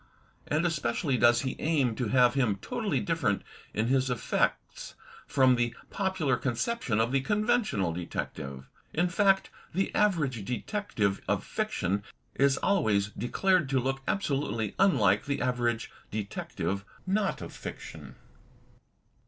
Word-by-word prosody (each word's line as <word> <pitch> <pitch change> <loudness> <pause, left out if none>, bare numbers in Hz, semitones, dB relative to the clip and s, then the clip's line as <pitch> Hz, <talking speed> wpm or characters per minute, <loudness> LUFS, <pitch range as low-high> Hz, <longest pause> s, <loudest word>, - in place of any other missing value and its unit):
And 155 +3 +1
especially 155 -3 0
does 120 0 +5
he 130 - -2
aim 145 -7 +2
to 125 - -1
have 125 +1 +4
him 125 -7 +2
totally 100 - -2
different - - 0 0.3
in 110 - 0
his 130 +1 +2
effects 125 -2 -1 0.3
from 130 -1 +4
the 120 -1 0 0.2
popular 190 -10 0
con 125 +1 -1
ception 125 - -1
of 115 +2 +2
the 135 0 +2
conventional 210 - +1
detective. 70 -5 -5 0.3
In 175 +3 +2
fact 195 +1 +3 0.2
the 195 +1 0
average 150 - +1
detective 115 - -1
of - - +1
fiction 100 +4 -1 0.3
is 140 -1 +3
always 105 - +2
declared 170 - +1
to 135 -1 +2
look 135 +2 -1
absolutely 135 - -1
unlike 110 - +4
the 140 0 -1
average 120 -2 0 0.2
detective 100 -1 -3 0.2
of 200 +1 -1
fiction. - - -8
130 Hz, 130 wpm, -29 LUFS, 110-175 Hz, 0.3 s, does